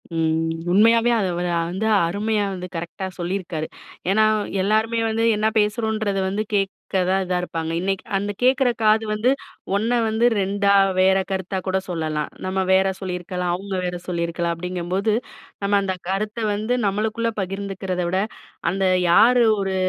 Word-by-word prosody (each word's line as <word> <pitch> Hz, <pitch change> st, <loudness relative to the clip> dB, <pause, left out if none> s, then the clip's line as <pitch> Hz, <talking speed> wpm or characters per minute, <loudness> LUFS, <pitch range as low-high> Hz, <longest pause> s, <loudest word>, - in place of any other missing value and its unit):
ம். 160 Hz, 0 st, +1 dB, 0.2 s
உண்மையாவே 230 Hz, +4 st, +5 dB
அதை 190 Hz, -, 0 dB
வத 175 Hz, 0 st, -1 dB
வ -, -, +1 dB
வந்து 195 Hz, +4 st, -2 dB, 0.2 s
அருமையா 210 Hz, +3 st, 0 dB
வந்து 180 Hz, -1 st, -6 dB
கரெக்டா 170 Hz, +3 st, -5 dB
சொல்லியிருக்காரு. 175 Hz, -3 st, -3 dB, 0.4 s
ஏன்னா 215 Hz, +2 st, +4 dB, 0.4 s
எல்லாருமே 220 Hz, +3 st, +1 dB
வந்து 225 Hz, +1 st, 0 dB
என்ன 215 Hz, +1 st, +1 dB
பேசுறோன்றத 215 Hz, -1 st, 0 dB
வந்து 210 Hz, +3 st, -1 dB
கேட்க 195 Hz, -1 st, +1 dB, 0.4 s
தான் 190 Hz, 0 st, +2 dB
இதா 180 Hz, 0 st, 0 dB
இருப்பாங்க. 165 Hz, -2 st, -4 dB
இன்னைக்கு 195 Hz, 0 st, -1 dB
அந்த 205 Hz, +1 st, -2 dB
கேட்குற 255 Hz, 0 st, +4 dB
காது 215 Hz, +1 st, +4 dB
வந்து 225 Hz, +5 st, +2 dB, 0.4 s
1 220 Hz, +4 st, 0 dB, 0.2 s
வந்து 220 Hz, +2 st, +1 dB, 0.2 s
2 200 Hz, +1 st, +2 dB, 0.3 s
வேற 190 Hz, +1 st, +5 dB
கருத்தா 190 Hz, 0 st, -2 dB
கூட 190 Hz, 0 st, +1 dB
சொல்லலாம். 155 Hz, -3 st, -2 dB, 0.2 s
நம்ம 190 Hz, 0 st, 0 dB
வேற 190 Hz, +1 st, +4 dB
சொல்லியிருக்கலாம். 180 Hz, -1 st, -3 dB
அவங்க 195 Hz, +1 st, -5 dB
வேற 180 Hz, 0 st, -2 dB
சொல்லியிருக்கலாம். 170 Hz, -1 st, -1 dB
அப்படிங்கும்போது 180 Hz, +4 st, -2 dB, 0.5 s
நம்ம 200 Hz, +1 st, +3 dB
அந்த 190 Hz, -1 st, -1 dB
கருத்தை 215 Hz, +3 st, -2 dB
வந்து 215 Hz, +4 st, -1 dB
நம்மளுக்குள்ள 220 Hz, +3 st, 0 dB
பகிர்ந்துக்கிறத 190 Hz, -1 st, -3 dB
விட, 185 Hz, +1 st, +1 dB, 0.5 s
அந்த 195 Hz, 0 st, 0 dB, 0.3 s
யார் 245 Hz, +6 st, +6 dB, 0.2 s
ஒரு 195 Hz, -1 st, -1 dB
195 Hz, 150 wpm, -22 LUFS, 180-215 Hz, 0.5 s, யார்